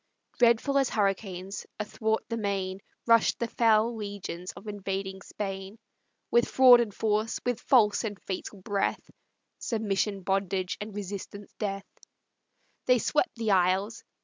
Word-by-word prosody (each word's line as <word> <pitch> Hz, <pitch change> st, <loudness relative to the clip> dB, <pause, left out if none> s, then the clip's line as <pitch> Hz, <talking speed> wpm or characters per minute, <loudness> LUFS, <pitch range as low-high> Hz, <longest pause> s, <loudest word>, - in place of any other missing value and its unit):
Dreadful 245 Hz, +4 st, +4 dB
as 270 Hz, -, +1 dB
hurricanes, 195 Hz, -2 st, -2 dB
athwart 220 Hz, +1 st, -1 dB
the 230 Hz, -, -3 dB
main 195 Hz, -3 st, -2 dB, 0.3 s
Rush'd 230 Hz, -1 st, +4 dB
the 235 Hz, -, -1 dB
fell 230 Hz, 0 st, +3 dB
legions 200 Hz, -4 st, -6 dB
of 195 Hz, -, -13 dB
invading 195 Hz, -1 st, -4 dB
Spain; 195 Hz, +1 st, -6 dB, 0.5 s
With 235 Hz, 0 st, +4 dB
fraud 255 Hz, -2 st, +8 dB
and 235 Hz, -3 st, 0 dB
force, 215 Hz, +1 st, 0 dB
with 245 Hz, -2 st, 0 dB
false 220 Hz, -5 st, +4 dB
and 210 Hz, -3 st, -4 dB
fatal 190 Hz, 0 st, -6 dB
breath 200 Hz, 0 st, -1 dB, 0.5 s
(Submission 210 Hz, -3 st, -1 dB
bondage, 190 Hz, -1 st, -1 dB
and 210 Hz, -1 st, -6 dB
resistance 200 Hz, 0 st, -7 dB
death), 195 Hz, -2 st, -3 dB, 1.0 s
They 250 Hz, -, +6 dB
swept 300 Hz, -, 0 dB
the 225 Hz, -3 st, -1 dB
isles. 190 Hz, +4 st, +2 dB
205 Hz, 130 wpm, -28 LUFS, 195-225 Hz, 1.0 s, fraud